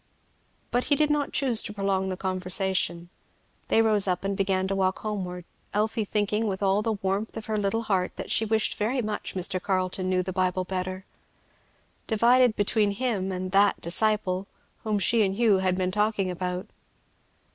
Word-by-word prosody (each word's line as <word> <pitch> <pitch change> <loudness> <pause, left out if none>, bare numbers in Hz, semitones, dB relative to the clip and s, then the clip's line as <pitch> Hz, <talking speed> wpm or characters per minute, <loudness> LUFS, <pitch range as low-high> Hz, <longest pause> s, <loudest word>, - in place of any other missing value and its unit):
But 245 +1 +1
he 290 - +3
did 300 +1 +2
not 295 -1 0
choose 255 -5 +3
to 210 - -3
prolong 195 -2 -1
the 185 - -3
conversation. 185 -2 -1 0.6
They 225 - +4
rose 210 -3 +3
up 180 0 0
and 195 0 -1
began 190 -1 0
to 195 - 0
walk 190 -1 +1
homeward, 180 -5 -5 0.3
Elfie 215 +1 0
thinking 210 +2 0
with 195 0 -3
all 195 +1 +3
the 225 0 0
warmth 200 +2 -2
of 220 - -6
her 220 - -2
little 210 +2 0
heart 190 -4 -1
that - - -6
she 225 - +3
wished 220 0 0
very 240 +4 0
much 210 -2 -4
Mr. 185 0 0
Carleton 185 -1 -1
knew 185 0 +1
the 185 0 -5
Bible 185 0 0
better; 185 +1 -4 1.0
divided 240 +1 +4
between 205 0 +1
him 200 -4 -1
and 185 0 -4
"that 200 +2 +4
disciple" 195 +1 0 0.4
whom 215 -1 0
she 220 +3 +3
and 190 -1 0
Hugh 215 -3 +3
had 185 -1 +1
been 185 0 -1
talking 210 -2 0
about. 180 +1 -3
195 Hz, 180 wpm, -26 LUFS, 185-215 Hz, 1.0 s, They